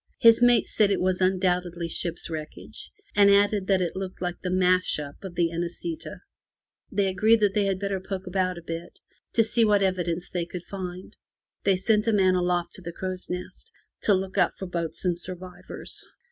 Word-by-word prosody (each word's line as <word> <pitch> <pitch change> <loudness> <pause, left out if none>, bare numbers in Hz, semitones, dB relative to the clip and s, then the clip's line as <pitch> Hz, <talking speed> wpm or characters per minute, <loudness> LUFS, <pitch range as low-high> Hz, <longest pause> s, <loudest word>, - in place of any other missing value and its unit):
His 230 -1 +6
mate 245 -1 +5
said 210 -2 +3
that - - +3
it - - -1
was 185 0 0
undoubtedly 180 -2 +1
ship's 170 +1 -2
wreckage, 155 -2 -8 0.2
and 200 -1 +6
added 200 -1 +3
that 190 -2 +3
it 170 - -3
looked 190 -1 -5
like 175 -1 -4
the 185 - -3
smash 185 0 +2
up 145 +2 -8
of 185 -3 -7
the 170 -1 +2
Inesita'' 175 - -5 0.7
They 200 - +1
agreed 215 +4 +4
that 205 -2 +3
they 205 -1 +2
had 195 -1 0
better 200 -1 -2
poke 190 0 -5
about 185 -1 -1
a 170 - -9
bit 165 +1 -6 0.4
to 230 - +5
see 230 +1 +2
what 205 -2 +4
evidence 180 -2 -1
they 175 -2 -3
could 175 0 -7
find. 185 +1 -7 0.5
They 195 -1 +4
sent 210 +3 +2
a 225 - +3
man 190 -2 +4
aloft 180 -1 0
to - - -11
the 170 -1 -6
crow's 185 +1 -4
nest 180 0 -6 0.3
to 205 - +4
look 190 +1 -2
out 180 - +2
for 190 - -5
boats 170 -1 -4
and 180 -1 +2
survivors. 180 +1 -7
185 Hz, 200 wpm, -26 LUFS, 175-200 Hz, 0.7 s, His